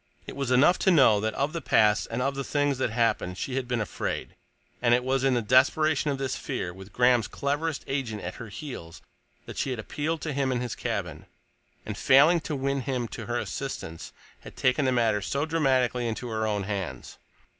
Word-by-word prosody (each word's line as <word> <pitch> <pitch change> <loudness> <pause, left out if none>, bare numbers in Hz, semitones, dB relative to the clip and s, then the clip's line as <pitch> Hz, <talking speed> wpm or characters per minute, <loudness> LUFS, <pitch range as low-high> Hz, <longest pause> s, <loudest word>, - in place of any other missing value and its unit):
It - - -8
was 140 -3 -2
enough 140 +8 +5
to - - +3
know 130 - +6
that 110 +1 -2
of 140 +3 -1
the 165 - -3
past, 105 -5 +3
and 120 +2 -2
of 135 +1 0
the 140 0 -3
things 145 0 0
that 130 - +1
happened, 110 -5 0
she 130 - -4
had 130 -2 -2
been 125 -1 -1
afraid, 105 - -4 0.5
and 120 -1 +5
it 125 - 0
was 130 +1 0
in 135 -2 +3
the 120 - 0
desperation 140 +6 +3
of 140 - -1
this 135 -1 -2
fear, 110 -10 -4
with 95 +2 -12
Graham's 125 -2 +3
cleverest 145 +2 -2
agent 130 -6 -3
at 90 - -4
her 115 - -7
heels, 100 - -8 0.4
that - - -7
she - - -1
had 130 - -2
appealed 150 +8 -3
to 155 - -3
him 135 -1 0
in 125 - 0
his 125 -2 -3
cabin, - - -4 0.6
and, - - -4
failing 155 +6 +5
to 155 -1 -4
win 140 0 -1
him 125 -2 -2
to 110 - -7
her 120 0 -1
assistance, 120 -11 -5 0.3
had - - -12
taken 130 +3 +2
the 130 - +2
matter 115 -4 +2
so 140 +9 -1
dramatically 130 -6 +1
into 115 +2 -4
her 110 -1 -1
own 105 -2 -1
hands. 95 -3 -5
130 Hz, 210 wpm, -27 LUFS, 110-140 Hz, 0.6 s, know